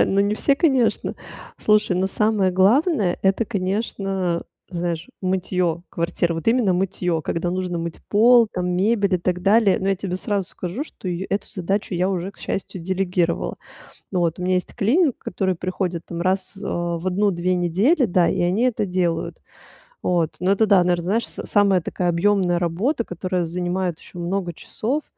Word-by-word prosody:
да, - - +6
но 195 +1 +1
не 205 +1 +2
все, 280 +5 +2
конечно. 265 -7 +1 0.4
Слушай, 210 -4 +2
но 190 +1 +1
самое 210 -1 +1
главное- 205 - +3
это, 195 +4 +2
конечно, 195 -3 -2 0.3
знаешь, 170 +1 -3
мытьё 180 -2 0
квартиры, 170 0 -1
вот 165 - -6
именно 225 -5 +3
мытьё, 180 -3 -1
когда 170 +3 -2
нужно 180 -1 -2
мыть 165 -1 -5
пол, 230 +2 +6
там, 180 0 -2
мебель 200 +1 +2
и - - +2
так 180 +1 -1
далее, 205 -1 +4
но 195 - -1
я 195 - +2
тебе 185 -2 -3
сразу 195 -1 -2
скажу, 185 +10 -5
что 185 - -8
и 175 +2 -3
эту 200 - -1
задачу 195 0 -2
я 180 +2 +1
уже, 185 +1 -3
к - - -24
счастью, 185 -2 -4
делегировала. 180 -2 -1 0.6
Вот, 175 -2 0
у - - -4
меня 185 0 +1
есть 180 - -1
клининг, 260 - +2
который 190 -2 -2
приходит, 180 -1 -3
там, 170 0 -5
раз, 190 +1 -1
а, 175 -3 -2
в 185 - -4
1-2 185 -2 +1
недели, 200 - +2
да, 180 -3 +3
и - - -1
они 185 +7 +1
это 235 -4 +1
делают. 180 -3 -1 0.6
Вот, 170 -3 0
но 185 +2 +2
это, 220 +2 +3
да, 200 -3 +5
наверно, 175 -1 +1
знаешь, 215 +6 0
с - - -8
самая 200 -3 +3
такая 175 +2 -2
объемная 180 0 +2
работа, 200 - 0
которая 180 0 -2
занимает 175 0 -2
ещё - - -14
много 175 +1 -2
часов, 270 - -3
185 Hz, 175 wpm, -22 LUFS, 175-205 Hz, 0.6 s, да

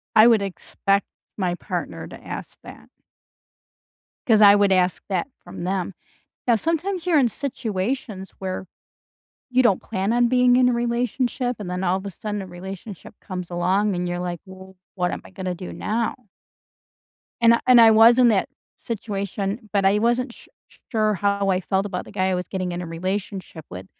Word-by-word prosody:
I 220 +1 +8
would 225 -3 +5
expect 195 +1 -1 0.3
my 180 -3 0
partner - - -5
to - - -12
ask - - -7
that. - - -12 1.4
'Cause 220 -3 +5
I 205 -1 +9
would 200 -1 +3
ask 185 -1 +2
that 185 +1 -1 0.2
from - - -8
them. 190 +1 -2 0.5
Now 240 - +5
sometimes 335 - -1
you're 335 -4 +4
in 260 - +4
situations 220 -5 -3
where 190 0 -4 0.8
you 255 0 +3
don't 200 -6 +3
plan 195 +4 -2
on 240 0 +3
being 250 0 +4
in 250 0 +5
a - - +1
relationship, 245 +1 -1
and 200 -4 -6
then 180 +1 -3
all 185 0 +2
of 195 - -8
a - - -3
sudden, 210 +1 -5
a 190 - -8
relationship 190 +1 -9
comes 180 -3 -6
along, 185 +3 +1
and 180 0 -2
you're 175 0 -3
like, 175 -2 -4 0.5
"What 180 -2 0
am - - -5
I - - -15
gonna 185 -1 -4
do 180 +1 -8
now?" 225 +2 -1 1.3
And 230 0 +6
and 250 -2 +8
I 225 -1 +8
was 225 +3 +7
in 245 -1 +6
that 200 -4 +1 0.3
situation, 205 0 -4
but 200 -1 +2
I 200 +2 +4
wasn't 240 +2 +1
su - - -17 0.4
sure 215 -3 +2
how 200 +1 0
I 185 -1 +2
felt 190 +2 0
about 185 -3 -4
the - - -12
guy 185 0 0
I 185 - +1
was 180 -1 -4
getting 185 -2 -3
in 175 0 -4
a - - -5
relationship 185 -1 -4
with. 90 +1 -8
200 Hz, 185 wpm, -23 LUFS, 185-235 Hz, 1.4 s, I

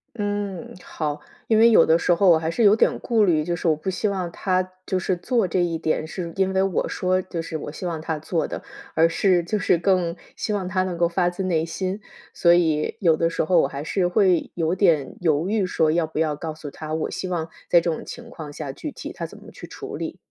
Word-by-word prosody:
嗯， 205 -3 -3
好。 150 -2 -4 0.3
因 220 -1 +4
为 230 +1 +7
有 - - +6
的 160 +1 +4
时 175 - +2
候 190 +3 +3
我 165 -2 +7
还 160 0 -2
是 230 +8 0
有 205 0 +7
点 - - +2
顾 225 -3 +2
虑， 160 -5 +3
就 170 +2 -2
是 175 - -4
我 155 - +4
不 155 - -6
希 190 +3 0
望 185 -3 -2
他 185 -1 +1 0.2
就 185 - -1
是 185 0 -1
做 205 +2 0
这 180 +1 +1
一 165 -2 -1
点 155 -1 -1
是 170 0 -5
因 190 0 +1
为 190 0 +2
我 195 -2 0
说 185 0 0
就 175 -2 -5
是 165 -1 -5
我 150 -1 -6
希 180 - -6
望 165 -2 -2
他 160 -1 -2
做 160 +2 -1
的， - - -6 0.3
而 165 +1 +5
是 180 +1 +2
就 210 +4 -1
是 180 - +2
更 180 -2 +1 0.2
希 215 - -2
望 195 -3 -2
他 185 0 +1
能 180 -2 -3
够 170 -1 +3
发 175 0 +1
自 175 +2 -5
内 165 -3 +1
心， 185 +4 -3 0.3
所 170 - +4
以 160 -3 +2
有 165 -4 +4
的 165 +1 +1
时 - - -1
候 170 0 +4
我 - - +1
还 140 +1 -6
是 175 +4 0
会 185 -3 +2
有 165 +1 0
点 165 -8 +2
犹 160 +1 +1
豫 215 -2 +1
说 160 -3 +1
要 165 0 +1
不 155 - -6
要 155 -2 +1
告 160 0 -5
诉 155 -2 -8
他， 155 +1 -7
我 160 0 -2
希 185 - -4
望 165 -3 -2 0.2
在 175 - +7
这 170 - -1
种 160 - -4
情 235 -1 -9
况 155 -11 -9
下， 145 -2 -6
具 300 - -6
体 - - -7
他 - - -5
怎 - - -9
么 - - -13
去 - - -10
处 - - -8
理。 - - -5
175 Hz, 275 characters per minute, -23 LUFS, 160-190 Hz, 0.3 s, 为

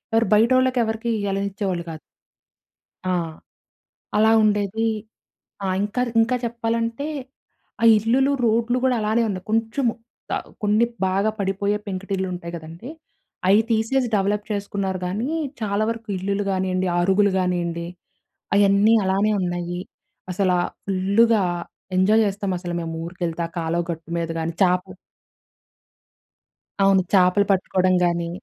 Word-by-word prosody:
ఎవరు 225 0 +3
బయటోళ్ళకెవరకీ 235 0 +2
ఇయ్యాలనిచ్చేవాళ్ళు 195 -2 -2
కాదు. 155 - -7 1.1
ఆ! 185 - 0 1.1
అలా 220 +1 +5
ఉండేదీ. 210 +1 +1 0.8
ఆ! - - 0 0.2
ఇంకా 210 +5 -2
ర్ - - -5
ఇంకా 240 +3 +1
చెప్పాలంటే, 230 +3 -2 0.7
ఆ - - -1
ఇల్లులు, 255 +6 +2
రోడ్లు 230 +2 +2
గూడలానే 235 -3 +2
ఉంది. 185 -2 -3
కొంచుము 225 +2 +1 0.4
ఆహ్, - - -5 0.2
కొన్ని 210 +3 +3 0.2
బాగా 195 +3 +1
పడిపోయే 200 +1 0
పెంకుటిల్లుంటయి 185 -3 -4
కదండీ, 165 - -9 0.6
అయి 205 +3 +6
తీసేసి 230 +4 +1
డవలప్ 205 +1 0
చేసుకున్నారు 200 -2 -2
గానీ, 215 +9 -2 0.3
చాలా 205 0 0
వరకు 230 0 -5
ఇల్లులు 200 +2 -1
గానియండి, 185 0 0
అరుగులు 195 +3 +3
గానియండి, 170 -2 -1 0.7
అయన్నీ 200 +2 +5
అలానే 195 +3 +2
ఉన్నయ్యీ. 175 0 -3 0.5
అసలా 185 -1 +1 0.3
ఫుల్లుగా 200 +3 +3 0.5
ఎంజాయ్ 215 +4 +4
చేస్తామసల 190 -3 -2
మేమూరికెళ్తే, 165 +1 -4
ఆ - - -20
కాలవ 170 +1 -1
గట్టు 165 0 -8
మీద 165 -1 -2
గానీ, 160 +1 -2
చాపు 180 +1 +1 1.9
అవును. 195 -1 +5
చాపలు 185 +2 +4
పట్టుకోడం 185 -1 +2
గానీ. 170 -1 0
200 Hz, 110 wpm, -23 LUFS, 185-220 Hz, 1.9 s, అయి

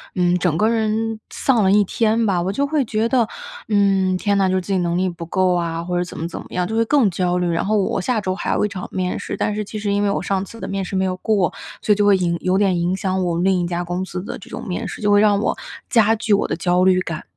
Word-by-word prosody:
嗯， 180 -1 +2
整 170 -2 +1
个 215 +4 +3
人 225 0 -1
丧 240 -6 +1
了 190 - +3
一 205 +1 +5
天 225 +3 +1
吧。 190 -3 +1
我 185 +2 -1
就 280 - 0
会 290 -2 0
觉 220 0 0
得， 240 -3 +2 0.4
嗯， 195 -3 +2
天 200 +1 +1
呐， 195 -1 +3
就 185 - 0
是 185 - +1
自 190 - -7
己 - - +2
能 170 -1 0
力 185 +1 +1
不 170 -1 -7
够 185 +1 +1
啊， 170 -1 -2
或 180 +1 -2
者 175 - +1
怎 180 - -9
么 165 - -3
怎 170 - -7
么 - - -10
样， 180 -1 -1
就 220 - -3
会 230 0 +2
更 260 -4 +3
焦 180 0 0
虑。 180 -1 0
然 165 0 0
后 215 +2 +1
我 195 - 0
下 230 +2 0
周 185 -1 -2
还 - - -2
有 - - +1
一 - - +1
场 190 -3 -6
面 185 -1 -2
试， - - -5
但 210 - -1
是 210 0 -3
其 215 +2 -6
实 205 -1 -1
因 205 0 +1
为 205 - +2
我 - - -1
上 195 +1 -1
次 230 +4 -12
的 - - -5
面 195 -1 -3
试 190 - -5
没 190 0 +1
有 185 -1 -2
过， 195 -3 +1 0.3
所 - - 0
以 - - +1
就 205 0 +2
会 205 -1 +6
影 170 -2 0
有 185 0 +1
点 190 -3 +2
影 175 +2 0
响 190 -1 -1
我 170 -1 -1
另 190 +1 +2
一 - - -1
家 175 0 -2
公 175 +2 -3
司 180 0 -5
的 - - -6
这 - - -13
种 - - -7
面 180 - -3
试， - - -7
就 205 -1 +2
会 205 - +6
让 205 -1 +4
我 210 - -1 0.3
加 225 -2 +4
剧 220 -1 0
我 200 - +2
的 - - -2
焦 180 +1 +1
虑 185 -1 +4
感。 165 -3 -5
190 Hz, 330 characters per minute, -20 LUFS, 180-210 Hz, 0.4 s, 会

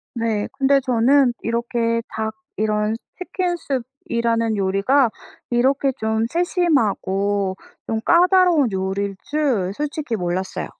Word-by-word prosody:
네 225 -3 -1
근데 270 0 +3
저는 255 +1 +3
이렇게 230 0 -1
닭 220 0 -4 0.2
이런 215 +1 0 0.2
치킨 365 -1 -2
수프 270 -6 -3 0.2
이라는 230 -1 0
요리가 200 +7 +2 0.4
이렇게 265 +3 +2
좀 220 +1 0
세심하고 205 - 0 0.3
좀 220 -1 -1
까다로운 355 - +4
요리일 195 +1 -2
줄 260 -11 0
솔직히 295 -3 -3
몰랐어요. 180 0 -3
230 Hz, 250 characters per minute, -21 LUFS, 210-280 Hz, 0.4 s, 까다로운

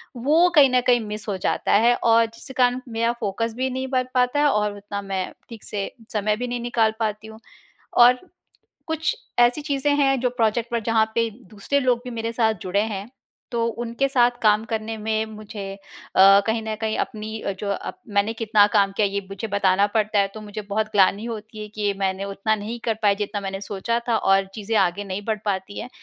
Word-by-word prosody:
वो 310 +9 +4
कहीं 280 -3 +7
न 250 - +4
कहीं 245 -1 +5
मिस 210 +1 -6
हो 195 - -1
जाता - - 0
है। 240 0 +5
और 230 0 +4
जिसके 230 +4 -9
कारण 250 0 +3 0.2
मेरा 230 +1 +2
फ़ोकस 225 +2 -2
भी 260 +1 0
नहीं 260 +1 -3
बन 255 0 +1
पाता 250 +3 +2
है, 295 - +4
और 210 -2 0
उतना 200 0 -6
मैं 190 -2 -3 0.2
ठीक 230 -3 -10
से 200 -2 -4 0.2
समय 210 0 +1
भी 245 +2 -4
नहीं 245 0 -3
निकाल 230 -2 +1
पाती 215 0 -2
हूँ। 220 0 -12 0.6
और 245 +1 +7 0.7
कुछ 320 +9 -1 0.2
ऐसी 240 +5 +4
चीज़ें 285 -1 0
हैं, 270 -2 +2
जो 250 0 +1
प्रोजेक्ट 235 0 0
पर, 235 - +1
जहाँ 220 0 +1
पे 230 -1 +2 0.2
दूसरे 215 +7 -1
लोग 250 -2 +1
भी 250 - -6
मेरे 230 0 -3
साथ 225 -2 +2
जुड़े 195 +2 0
हैं, 200 +4 -6 0.4
तो 230 -1 0 0.2
उनके 235 +4 -1
साथ 245 -2 +4
काम 215 0 +4
करने 225 0 -3
में 220 0 -1
मुझे 210 -2 -7
अ, 195 0 +3
कहीं 225 0 0
न 220 -1 -3
कहीं 220 0 -1
अपनी 220 0 -4
अ, 200 - -2
जो 200 -1 -1 0.4
मैंने 205 +2 +2
कितना 215 -2 +4
काम 200 -1 +4
किया, 210 -2 +3
ये 200 0 -2
मुझे 195 +3 -5
बताना 200 0 +2
पड़ता 215 -1 +2
है। 195 - +3
तो 215 - -8
मुझे 210 0 -7
बहुत 215 +1 0
ग्लानि 200 +2 +3
होती 220 -1 -7
है 210 - -6
कि 205 -1 0
मैंने 190 0 -1
उतना 200 +2 -1
नहीं 220 +3 -6
कर 225 - +2
पाई 200 -1 +4
जितना 205 0 -3
मैंने 195 0 -5
सोचा 210 +4 -2
था, 230 - +3
और 195 0 +3
चीज़ें 220 +1 -3
आगे 190 +1 +1
नहीं 195 0 -4
बढ़ 220 -1 0
पाती 195 0 -3
हैं। 250 - -6
220 Hz, 210 wpm, -23 LUFS, 205-240 Hz, 0.7 s, कहीं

